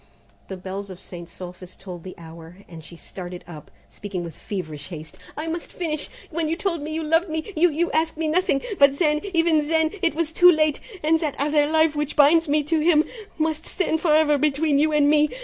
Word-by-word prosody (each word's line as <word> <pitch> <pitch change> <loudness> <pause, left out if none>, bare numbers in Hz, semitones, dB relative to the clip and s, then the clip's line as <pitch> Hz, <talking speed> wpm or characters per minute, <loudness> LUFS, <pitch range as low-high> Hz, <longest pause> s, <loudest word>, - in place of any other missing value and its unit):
The 190 - -6
bells 195 +2 -6
of 185 -1 -9
St. 175 -2 -10
Sulpice 180 +1 -10
tolled 180 -3 -9
the 185 - -9
hour, 165 +1 -12
and 165 -2 -11
she 170 - -10
started 180 +1 -9
up, 155 -4 -11 0.2
speaking 190 -4 -6
with 165 -3 -8
feverish 155 -7 -6
haste, 160 -1 -9 0.2
"I 305 - -3
must 330 +1 -5
finish! 310 -4 -3 0.2
When 320 -1 -1
you 325 - 0
told 340 -3 -2
me 305 +2 -5
you 320 +1 -3
loved 325 +3 +2
me 320 +6 -4
you 345 +3 +4
you 335 +3 -1
asked 320 0 0
me 320 0 -1
nothing; 335 -2 +1 0.2
but 280 0 +5
then, 300 -2 +2
even 325 -3 +3
then, 320 0 +2
it 335 -4 +1
was 325 -1 -1
too 355 +2 +7
late, 310 -2 +1 0.2
and 320 +1 +3
that 305 -4 -2
other 295 +1 +2
life 315 0 +2
which 295 -1 -2
binds 315 +3 +5
me 300 +1 +2
to 315 +2 0
him, 310 -1 +4 0.3
must 315 0 -1
stand 320 -4 -1
for 315 -3 +3
ever 300 -2 +3
between 295 0 +2
you 310 +1 +3
and 295 -1 +3
me! 300 0 +4
300 Hz, 220 wpm, -23 LUFS, 190-320 Hz, 0.3 s, too